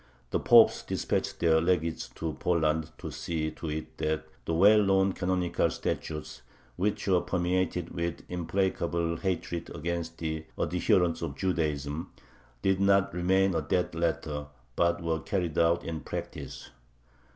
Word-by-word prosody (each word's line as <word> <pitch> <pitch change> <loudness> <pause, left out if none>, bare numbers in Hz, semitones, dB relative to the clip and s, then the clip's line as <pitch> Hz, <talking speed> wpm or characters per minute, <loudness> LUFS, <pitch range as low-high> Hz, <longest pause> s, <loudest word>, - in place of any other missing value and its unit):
The - - +1
popes - - +6
dispatched - - -2
their 80 -1 +4
legates 85 -2 0
to 80 -1 -3
Poland 80 -2 +1
to - - -6
see 80 -2 -2
to 80 +1 -6
it 75 +1 -5
that 80 0 -1 0.2
the 85 - -1
well 105 +5 +7
known 95 -1 +3
canonical 90 -1 0
statutes, 75 -1 -4 0.3
which 100 +3 -1
were 90 -2 +4
permeated 90 -1 0
with 85 -1 -3
implacable 85 -1 -1
hatred 85 -2 -3
against 85 +1 -3
the 80 -1 -3
adherents 90 -2 +2
of 75 -5 -3
Judaism, 80 -3 -1 0.5
did 95 0 +2
not 100 0 +3
remain 95 +2 +2
a 80 - +1
dead 90 +4 0
letter, 80 -3 -2 0.3
but 85 0 +1
were 80 -1 0
carried 85 0 -1
out 85 +1 +3
in 80 -1 -4
practice. - - -7
85 Hz, 140 wpm, -29 LUFS, 80-90 Hz, 0.5 s, well